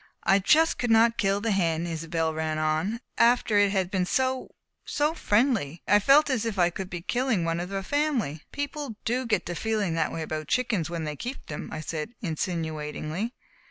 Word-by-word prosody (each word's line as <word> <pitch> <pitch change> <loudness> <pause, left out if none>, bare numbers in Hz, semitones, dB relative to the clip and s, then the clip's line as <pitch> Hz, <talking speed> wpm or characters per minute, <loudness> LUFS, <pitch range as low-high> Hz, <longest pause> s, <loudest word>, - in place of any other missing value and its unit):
"I 195 +3 +4
just 315 - +4
could 245 - 0
not 230 +1 +4
kill 195 0 +2
the 225 0 0
hen," 170 -4 +1
Isobel 165 -1 -2
ran 155 0 -2
on, 155 +9 0 0.2
"after 235 -3 +4
it 205 -1 +4
had 190 -2 0
been 185 -3 0
so 260 +2 0 0.3
so 295 +2 0
friendly. 210 - +1
Could - - -4
I? - - +8
I - - +3
felt 280 +7 +5
as 245 -4 0
if 225 -3 -3
I 175 -1 +3
would 190 -1 -5
be 175 -2 -5
killing 240 -5 0
one 165 0 0
of 175 +1 -4
the 195 0 -3
family." 260 - 0
"People 285 -4 -4
do 250 +2 0
get 220 - +1
to 175 - -3
feeling 210 -2 -1
that 165 -1 0
way 165 - -3
about 155 -1 -4
chickens 215 - 0
when 170 -1 -3
they 150 -1 -3
keep 245 - -6
them," 145 - -6
I 155 - -4
said 155 +8 -5
insinuatingly. 160 - -3
195 Hz, 205 wpm, -27 LUFS, 165-235 Hz, 0.3 s, I